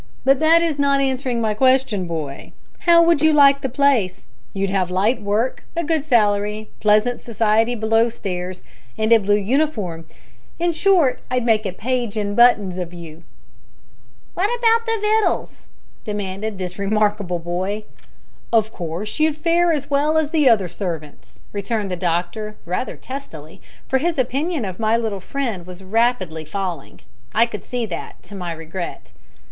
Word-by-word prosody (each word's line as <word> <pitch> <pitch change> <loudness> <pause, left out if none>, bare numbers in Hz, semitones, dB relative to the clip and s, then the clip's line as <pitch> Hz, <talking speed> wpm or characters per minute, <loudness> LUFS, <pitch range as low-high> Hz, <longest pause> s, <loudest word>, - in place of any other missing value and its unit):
But 270 0 +4
that 325 +2 +5
is 315 -4 -1
not 280 -1 +3
answering 260 -3 -1
my 220 -1 +1
question, 255 -5 +2
boy. 155 -5 -6 0.4
How 335 0 +8
would 335 -3 +3
you 315 0 +5
like 280 -2 +6
the 265 - -2
place? 245 -9 +1 0.2
You'd 195 0 -2
have 190 -2 0
light 205 +6 +1
work, 210 +5 -1
a 340 - 0
good 315 -2 0
salary, 210 -5 +1
pleasant 215 +3 +2
society 225 +1 +1
below 225 +1 +2
stairs, 180 -4 -5 0.3
and 220 +1 +3
a 230 - +7
blue 205 0 +2
uniform. 210 - -1 0.5
In 345 0 0
short, 340 -6 +3
I'd 250 -1 0
make 215 -3 +2
a - - -3
page 240 +2 -2
in 205 -1 -1
buttons 210 -6 +4
of 175 -1 -5
you." 165 -1 -10 1.1
"Wot 385 +4 +1
about 460 0 +3
the 455 0 +1
wittles?" 430 +1 0 0.4
demanded 205 0 -4
this 180 0 -6
remarkable 205 -2 0
boy. 185 +5 -3 0.7
"Of 220 -1 +2
course 175 - -5
you'd 310 -1 +2
fare 340 +2 +2
as 290 -3 -2
well 295 +3 +2
as 310 -1 +1
the 300 -5 +4
other 205 -6 +3
servants," 165 -5 -7
returned 205 0 -2
the - - -1
doctor, 180 +5 -2
rather 180 +9 -3
testily, 165 - -9 0.3
for 265 - +1
his 335 +3 -1
opinion 275 +2 -1
of 185 0 -6
my 220 +1 +2
little 220 -4 -2
friend 225 -7 -4
was 180 +1 -10
rapidly 190 -6 0
falling; 170 -2 -5 0.3
I 230 - +5
could 220 -3 -7
see 245 -2 -3
that, 180 -6 -7
to - - -13
my 180 -3 -5
regret. 165 - -7
220 Hz, 160 wpm, -21 LUFS, 185-275 Hz, 1.1 s, How